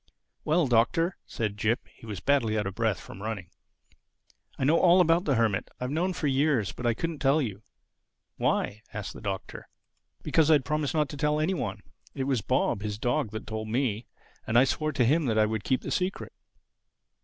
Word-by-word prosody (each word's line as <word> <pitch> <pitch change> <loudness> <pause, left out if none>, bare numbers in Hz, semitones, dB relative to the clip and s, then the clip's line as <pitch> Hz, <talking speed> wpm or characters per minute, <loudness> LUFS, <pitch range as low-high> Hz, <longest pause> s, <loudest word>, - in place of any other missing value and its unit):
"Well, 160 +2 +2
Doctor," 135 +9 +2
said 105 -3 -3
Jip 110 +3 0
(he 115 - -15
was 105 -4 -5
badly 120 -5 +2
out 105 - 0
of 95 - -3
breath 110 -4 0
from 95 - -11
running), 100 -4 -5 1.1
"I - - -2
know 155 +5 +4
all 180 +1 +6
about 170 0 +4
the 140 - +2
Hermit—I 115 +1 -1
have 125 - -2
known 175 +5 0
for 160 - -4
years. 135 -6 +2
But 125 - -4
I 115 - +2
couldn't 165 +3 -3
tell 140 +2 +3
you." 105 -8 -3 0.8
"Why?" 105 +1 0
asked 105 -2 -5
the - - -11
Doctor. 100 -3 -5 0.5
"Because 160 -1 +3
I'd 145 -5 +4
promised 150 +1 -1
not 150 -2 +2
to 145 - -7
tell 150 +1 +1
any 160 +5 +1
one. 105 - -4 0.3
It 135 - -2
was 130 -4 0
Bob, 120 -2 0
his 105 -1 -3
dog, 125 +2 0
that 110 0 -6
told 110 0 -4
me. 115 -1 -1 0.4
And 110 - +2
I 125 - +8
swore 155 +3 0
to 135 -4 +2
him 155 +6 +3
that 110 -2 +1
I 110 - +5
would 110 -1 -2
keep 130 +6 0
the - - -5
secret." 185 +1 -2
125 Hz, 200 wpm, -28 LUFS, 110-150 Hz, 1.1 s, I